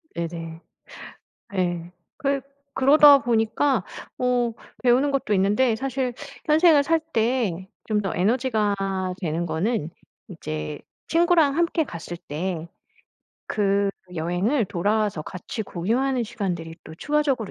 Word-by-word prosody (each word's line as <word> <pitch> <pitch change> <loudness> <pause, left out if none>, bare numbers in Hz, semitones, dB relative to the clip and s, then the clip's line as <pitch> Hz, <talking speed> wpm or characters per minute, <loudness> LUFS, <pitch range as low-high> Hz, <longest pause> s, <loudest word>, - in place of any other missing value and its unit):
네네. 165 -1 -5 0.9
예. 175 -2 -2 0.2
그 280 -3 0 0.3
그러다 285 +1 +7
보니까 230 -1 +1 0.3
어 245 -2 +1 0.3
배우는 255 +3 +3
것도 270 -6 -1
있는데 210 +5 +3
사실 260 0 -2 0.3
현생을 310 -1 +5
살 325 +3 +2
때 225 - -1 0.2
좀 210 -1 +2
더 195 -4 -3
에너지가 215 +1 +1 0.5
되는 170 0 -2
거는 165 +1 -1 0.4
이제 75 0 -5 0.3
친구랑 330 -4 +3
함께 335 -1 +1
갔을 170 -4 -7
때 170 +1 -4 0.8
그 200 -1 +2 0.3
여행을 180 - 0
돌아와서 205 -1 0
같이 185 +7 -6
공유하는 240 +8 0
시간들이 175 -7 -4
또 160 - -10
추가적으로 285 - 0
220 Hz, 240 characters per minute, -24 LUFS, 175-270 Hz, 0.9 s, 그러다